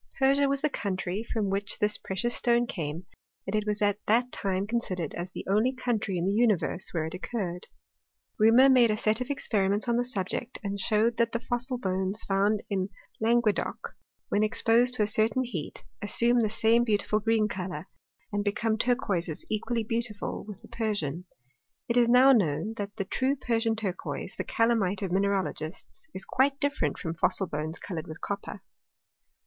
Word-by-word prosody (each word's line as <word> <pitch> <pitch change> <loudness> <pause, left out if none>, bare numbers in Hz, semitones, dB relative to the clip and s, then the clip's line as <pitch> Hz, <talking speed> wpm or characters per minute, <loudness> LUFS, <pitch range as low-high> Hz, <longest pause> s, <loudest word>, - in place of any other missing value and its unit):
Persia 275 +1 +3
was 275 0 0
the 305 - +2
country 190 -1 -2
from 210 -4 0
which 200 0 -2
this 210 0 0
pre 190 - -5
cious 240 +5 0
stone 240 0 +2
came, 165 -4 -5 0.4
and 195 - -2
it 215 0 0
was 210 0 0
at 205 0 +2
that 245 +3 +3
time 190 0 -1
considered 195 -8 -2
as 175 +1 -5
the - - -8
only 215 +7 +2
country 225 -7 -1
in 170 - -1
the 195 - +1
universe 210 -5 +1
where 160 -3 -1
it 160 - -5
occurred. 185 -2 -4 0.7
Reaumur 230 +5 +7
made 245 -3 +6
a 215 - +1
set 215 +3 +2
of 250 - -3
experiments 205 -6 0
on 235 0 +2
the 245 - +2
subject 240 +1 -3
and 200 0 -3
showed 220 +3 +2
that 230 0 +1
the 230 - 0
fossil 245 +2 -2
bones 190 -1 -2
found 200 +2 +1
in 190 -1 -1 0.3
Languedoc, 225 -1 0 0.3
when 205 - +2
exposed 230 +3 +3
to 215 - +2
a - - +3
certain 220 +4 +1
heat, 200 -12 -6 0.2
assume 235 +4 +2
the 220 -2 +2
same 225 +2 +3
beautiful 215 -1 +1
green 220 0 +2
colour, 180 -4 -5 0.5
and 205 0 0
become 220 +2 0
turquoises 200 - -1
equally 230 +2 -1
beautiful 225 -1 -3
with 210 -2 -10
the - - -12
Persian. 185 -8 -2 0.6
It 235 - 0
is 240 -1 +4
now 255 +3 +7
known, 210 - +2
that 205 0 -5
the 195 - -3
true 260 +7 0
Persian 230 -4 0
turquoise, 200 -4 -4
the - - -4
caZami^e 220 -4 +1
of 190 - -2
mineralogists, 195 - -2
is 190 - -7
quite 275 +2 +1
different 280 - 0
from 165 - -4
fossil 190 +3 +1
bones 155 0 -4
coloured 170 -5 -6
with 155 +1 -8
copper. 200 -1 -5
215 Hz, 180 wpm, -28 LUFS, 190-235 Hz, 0.7 s, Reaumur